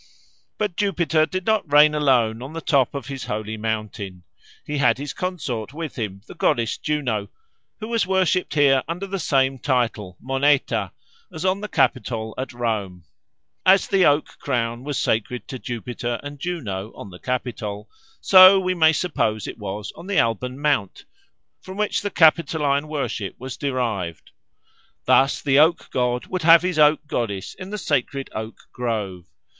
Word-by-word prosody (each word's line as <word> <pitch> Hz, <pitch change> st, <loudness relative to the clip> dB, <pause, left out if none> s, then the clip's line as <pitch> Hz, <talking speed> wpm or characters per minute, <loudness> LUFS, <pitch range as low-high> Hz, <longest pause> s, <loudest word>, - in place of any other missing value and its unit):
But 210 Hz, -5 st, -2 dB
Jupiter 170 Hz, -6 st, +1 dB
did 185 Hz, +3 st, -4 dB
not 220 Hz, -9 st, 0 dB
reign 150 Hz, +1 st, +7 dB
alone 125 Hz, -6 st, +2 dB
on 135 Hz, +4 st, -8 dB
the 165 Hz, -, -4 dB
top 140 Hz, -4 st, +1 dB
of 140 Hz, -, -5 dB
his 135 Hz, -1 st, -6 dB
holy 110 Hz, -1 st, -4 dB
mountain. 105 Hz, -4 st, -4 dB, 0.4 s
He 150 Hz, -1 st, -3 dB
had 140 Hz, -, +3 dB
his 145 Hz, 0 st, -5 dB
consort 145 Hz, -, -4 dB
with 160 Hz, -2 st, -5 dB
him, 100 Hz, -5 st, -5 dB
the -, -, -11 dB
goddess 115 Hz, -2 st, +1 dB
Juno, 125 Hz, -9 st, -1 dB, 0.5 s
who 215 Hz, -, -6 dB
was 230 Hz, -5 st, 0 dB
worshipped 185 Hz, -2 st, +1 dB
here 140 Hz, -3 st, +4 dB
under 175 Hz, +4 st, -4 dB
the 195 Hz, 0 st, -4 dB
same 135 Hz, -4 st, +1 dB
title, 115 Hz, -8 st, -1 dB
Moneta, 135 Hz, +2 st, +1 dB, 0.4 s
as 160 Hz, +3 st, -6 dB
on 190 Hz, +2 st, +1 dB
the 210 Hz, -, -4 dB
Capitol 115 Hz, -, 0 dB
at 130 Hz, -, -4 dB
Rome. 105 Hz, -7 st, -3 dB, 0.6 s
As 190 Hz, +1 st, +5 dB
the 195 Hz, -2 st, +3 dB
oak 145 Hz, +1 st, +1 dB
crown 120 Hz, -2 st, -2 dB
was 145 Hz, -2 st, -3 dB
sacred 115 Hz, +3 st, -1 dB
to 130 Hz, -, -6 dB
Jupiter 120 Hz, 0 st, -4 dB
and 145 Hz, 0 st, -8 dB
Juno 115 Hz, -, -4 dB
on 100 Hz, -, -10 dB
the 90 Hz, -, -12 dB
Capitol, 110 Hz, -5 st, -4 dB, 0.3 s
so 185 Hz, 0 st, +8 dB
we 185 Hz, -1 st, 0 dB
may 160 Hz, -2 st, +4 dB
suppose 110 Hz, -, -1 dB
it -, -, -7 dB
was 105 Hz, 0 st, -5 dB
on 180 Hz, -, -11 dB
the 200 Hz, -3 st, -1 dB
Alban 125 Hz, +2 st, 0 dB
Mount, 145 Hz, -10 st, -1 dB, 0.6 s
from 190 Hz, +1 st, -9 dB
which 210 Hz, 0 st, 0 dB
the 205 Hz, -, -2 dB
Capitoline 155 Hz, -4 st, +3 dB
worship 140 Hz, -9 st, -3 dB
was 130 Hz, 0 st, -7 dB
derived. 115 Hz, -, -3 dB, 0.7 s
Thus 135 Hz, +1 st, +3 dB
the 140 Hz, -1 st, +4 dB
oak 160 Hz, +2 st, +3 dB
god 125 Hz, -1 st, 0 dB
would 185 Hz, -1 st, -4 dB
have 165 Hz, +1 st, +7 dB
his 180 Hz, -3 st, -1 dB
oak 150 Hz, 0 st, +4 dB
goddess 105 Hz, -9 st, -3 dB
in 185 Hz, 0 st, -9 dB
the 210 Hz, -, -4 dB
sacred 140 Hz, -, -2 dB
oak 110 Hz, +1 st, -6 dB
grove. 105 Hz, -7 st, -3 dB
135 Hz, 165 wpm, -22 LUFS, 115-160 Hz, 0.7 s, so